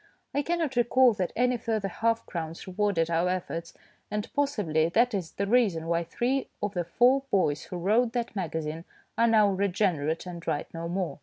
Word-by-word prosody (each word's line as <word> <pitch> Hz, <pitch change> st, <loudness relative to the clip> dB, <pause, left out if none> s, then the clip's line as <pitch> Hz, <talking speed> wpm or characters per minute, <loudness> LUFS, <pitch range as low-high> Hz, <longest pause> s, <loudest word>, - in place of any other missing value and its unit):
I 285 Hz, -, +1 dB
cannot 325 Hz, -3 st, -1 dB
recall 245 Hz, +1 st, +4 dB
that 185 Hz, -4 st, -2 dB
any 250 Hz, +1 st, +2 dB
further 220 Hz, -3 st, -1 dB
half 230 Hz, +4 st, 0 dB
crowns 165 Hz, -1 st, -5 dB
rewarded 185 Hz, -3 st, 0 dB
our 170 Hz, +2 st, +2 dB
efforts, 170 Hz, -2 st, -4 dB, 0.3 s
and 210 Hz, 0 st, -4 dB
possibly 200 Hz, -, +1 dB
that 235 Hz, +6 st, +3 dB
is 185 Hz, -5 st, -3 dB
the 200 Hz, -, -1 dB
reason 200 Hz, -8 st, +2 dB
why 170 Hz, 0 st, 0 dB
three 255 Hz, +10 st, -1 dB
of 205 Hz, -1 st, -2 dB
the 175 Hz, -3 st, -2 dB
four 245 Hz, +10 st, +4 dB
boys 150 Hz, -6 st, +1 dB
who 180 Hz, -, -6 dB
wrote 225 Hz, +7 st, +2 dB
that 235 Hz, -3 st, -3 dB
magazine 160 Hz, -3 st, -3 dB, 0.3 s
are 230 Hz, -, +3 dB
now 220 Hz, -2 st, +5 dB
regenerate 185 Hz, -5 st, 0 dB
and 175 Hz, -2 st, -8 dB
write 155 Hz, -3 st, -2 dB
no 165 Hz, 0 st, -5 dB
more. 180 Hz, -3 st, -3 dB
195 Hz, 180 wpm, -28 LUFS, 170-235 Hz, 0.3 s, now